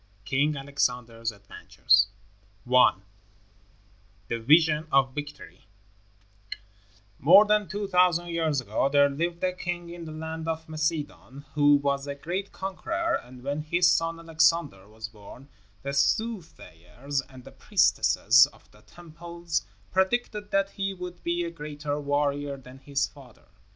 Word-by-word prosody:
] 100 - -33
King 145 +2 +1
Alexander's 125 -4 -2
Adventures 100 -1 +1 0.6
I. 125 0 +5 1.3
THE 115 - -2
VISION 155 +5 +4
OF 135 -1 +3
VICTORY 145 -8 -9 1.5
More 175 +9 +7
than 210 -1 +2
two 205 +3 -4
thousand 180 -2 +3
years 160 -4 0
ago 115 +3 -1
there 140 0 +5
lived 170 +4 -3
a 185 0 +1
king 175 -1 -5
in 170 -1 -8
the 155 - -8
land 160 +1 -6
of 160 0 -3
Macedon 155 -3 -4
who 145 -1 +5
was 140 0 -1
a 140 - -4
great 180 +7 -4
conqueror, 330 - -3
and 125 0 -14
when 145 +2 -2
his 175 +3 +3
son, 165 0 0
Alexander, 160 - +1
was 110 +1 -8
born, 115 +5 -14 0.3
the 140 0 -4
soothsayers 140 - -2
and 130 -1 -13
the - - -13
priestesses 120 +5 +4
of 145 - -22
the 105 - -20
temples 170 - -6 0.2
predicted 205 +2 0
that 195 0 +1
he 195 -1 -3
would 180 -1 -8
be 175 0 -1
a 170 - -5
greater 150 -2 -5
warrior 145 0 -1
than 130 0 -14
his 140 +1 -1
father. 130 -5 -16
150 Hz, 140 wpm, -27 LUFS, 135-175 Hz, 1.5 s, More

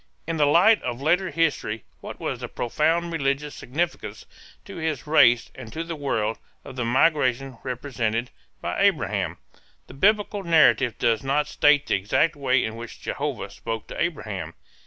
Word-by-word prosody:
In 165 0 -3
the 145 -2 +4
light 180 +9 +5
of 120 - -4
later 175 +6 +1
history 140 -10 -1 0.2
what - - -9
was - - -3
the - - -5
profound 165 +7 0
religious 145 -1 -1
significance 170 +7 -4 0.4
to 200 -2 -9
his 160 -5 -3
race 140 -7 +4
and 120 -4 -10
to 165 - -3
the 165 0 -5
world, 115 -7 -1 0.3
of 130 - -9
the 125 - -2
migration 130 -1 +1
represented 125 -2 -3 0.3
by - - -2
Abraham? - - +1 0.5
The - - -13
Biblical 205 +5 +2
narrative 160 - +4
does 115 -2 +1
not 140 +2 +1
state 145 -1 +3
the - - -1
exact 120 - +1
way 130 -3 +1
in 110 0 -5
which 115 0 -9
Jehovah - - -4
spoke 115 -1 -5
to - - -5
Abraham. 110 - -3
140 Hz, 160 wpm, -24 LUFS, 120-165 Hz, 0.5 s, light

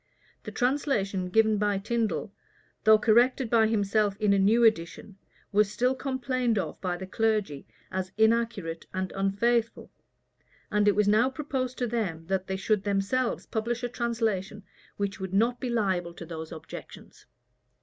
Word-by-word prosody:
The - - -6
translation 245 -8 0
given 220 +1 +3
by 205 -1 +1
Tindal, 225 +2 -2 0.5
though 215 0 +8
corrected 240 +3 +3
by 225 -2 +5
himself 205 -1 +1
in 210 -2 +3
a 200 - +3
new 220 +5 +4
edition, 195 -1 0 0.3
was 210 0 +3
still 250 +4 +1
complained 255 -3 -1
of 195 - -3
by 180 -2 -2
the 190 - -6
clergy 210 -8 -1 0.2
as 185 0 -3
inaccurate 220 -7 +1
and 185 0 -2
unfaithful; 220 +4 0 0.8
and 210 0 +2
it 205 - +4
was 210 0 +2
now 220 +5 +4
proposed 265 -2 -3
to 250 - 0
them, 205 -9 -3
that 190 -1 -1
they 190 - -2
should 210 +1 +1
themselves 205 +5 -1
publish 235 +2 -3
a 245 - -1
translation 225 -5 -2 0.3
which 200 0 -3
would 190 0 -4
not 235 +4 +2
be 255 - -3
liable 190 -7 -1
to 170 - -8
those 160 -1 -7
objections. 160 -1 -11
215 Hz, 155 wpm, -27 LUFS, 195-235 Hz, 0.8 s, though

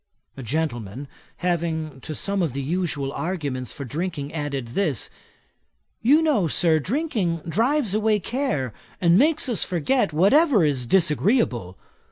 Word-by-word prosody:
A 135 - -8
gentleman 130 -2 -3 0.4
having 160 -5 -1
to 155 - -6
some 200 +4 -1
of 160 -7 -1
the 140 - -3
usual 150 -3 -2
arguments 145 -8 -3
for 140 - -6
drinking 150 +1 -4
added 140 -6 -3
this: 145 - -1 0.9
'You 290 +8 +5
know, 255 - +2
Sir, 160 0 +3
drinking 200 - -1
drives 230 - +1
away 215 0 +2
care, 205 - -2 0.3
and 170 -1 +4
makes 300 - +3
us 240 -4 +1
forget 180 - 0
whatever 205 - +4
is 135 -5 -1
disagreeable. 150 - +1
165 Hz, 135 wpm, -24 LUFS, 140-215 Hz, 0.9 s, You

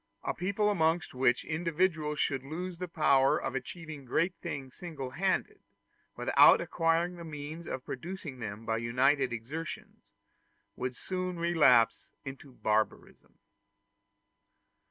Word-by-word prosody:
A - - -1
people 200 +3 0
amongst 165 -2 +1
which 125 -1 +2
individuals 160 -1 0
should 135 -2 0
lose 170 +5 -5
the 180 - -3
power 140 -5 +4
of - - -3
achieving 150 +3 -6
great 165 +8 +1
things 140 -6 -6
single 145 -7 -6
handed, 195 - -1 0.6
without - - +6
acquiring 170 +1 +1
the 170 - -8
means 155 +1 -7
of 130 - -5
producing 155 -1 -6
them 110 -1 -6
by 110 0 0
united 130 +3 +2
exertions, 140 +8 -6 0.7
would 125 0 -3
soon 185 +2 -3
relapse 160 -9 +4 0.2
into 135 0 -8
barbarism. 110 -2 -2
155 Hz, 120 wpm, -31 LUFS, 130-175 Hz, 0.7 s, without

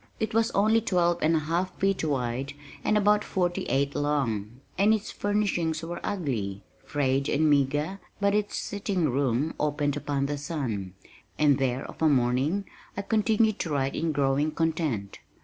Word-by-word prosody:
It 220 0 -2
was 225 +1 +3
only 220 +3 +4
twelve 175 -5 +1
and 160 +1 +3
a - - +3
half 175 +4 -1
feet 195 -2 +1
wide 135 -2 -1 0.3
and 210 - +2
about 210 0 +3
forty 175 -2 -1
eight 140 +1 0
long, 125 -7 -1 0.2
and 205 +3 +4
its 215 -1 -5
furnishings 185 -6 0
were 170 +1 -5
ugly, 110 - -2 0.2
frayed 140 -1 0
and 155 +2 +2
meager, 145 +6 +1 0.2
but 200 0 +2
its 210 0 0
sitting 195 -6 -1
room 135 +3 0
opened 145 -1 0
upon 145 -1 -1
the 145 0 -2
sun, 120 - -4 0.4
and 145 -3 +4
there, 130 0 0
of - - -11
a 160 - +5
morning, 135 +8 +1 0.3
I 200 - -2
continued 215 0 +2
to 170 - -2
write 140 -2 0
in 165 -1 0
growing 140 +1 +1
content. 155 - -1
150 Hz, 165 wpm, -27 LUFS, 135-195 Hz, 0.4 s, a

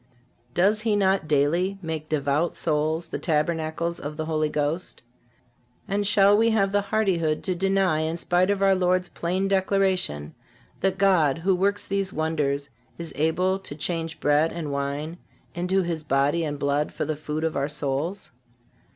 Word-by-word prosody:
Does 205 +4 +3
he 215 -2 +1
not 190 -4 +2
daily 160 +7 +1
make 160 -3 -5
devout 150 +2 0
souls 155 +1 -1
the - - -4
tabernacles 160 +1 -1
of 150 +1 -6
the 155 - -2
Holy 155 -1 0
Ghost? 150 +2 -2 0.8
And 205 0 0
shall 200 0 +5
we 225 +2 +4
have 200 -3 +2
the 205 0 +2
hardihood 190 -7 0
to 185 - 0
deny, 190 -2 +1
in 160 +1 -1
spite 180 +2 +1
of 200 -1 +1
our 195 0 +5
Lord's 180 -1 +1
plain 185 +3 -1
declaration, 190 - 0 0.5
that 190 0 0
God, 180 -8 +3
who 185 +4 +1
works 200 +2 0
these 195 -1 -1
wonders, 145 -3 -1 0.3
is 170 -1 -7
able 180 +6 +1
to 185 -7 -8
change 165 +1 -3
bread 150 +2 +3
and 160 -4 -4
wine 140 +4 -3 0.3
into 180 +2 0
His 170 -2 -3
body 145 +3 +1
and 145 -2 -3
blood 145 +1 0
for - - -3
the 155 +1 -2
food 155 +1 -4
of 160 -1 -1
our 140 +1 0
souls? 150 +6 -3
170 Hz, 165 wpm, -25 LUFS, 150-190 Hz, 0.8 s, shall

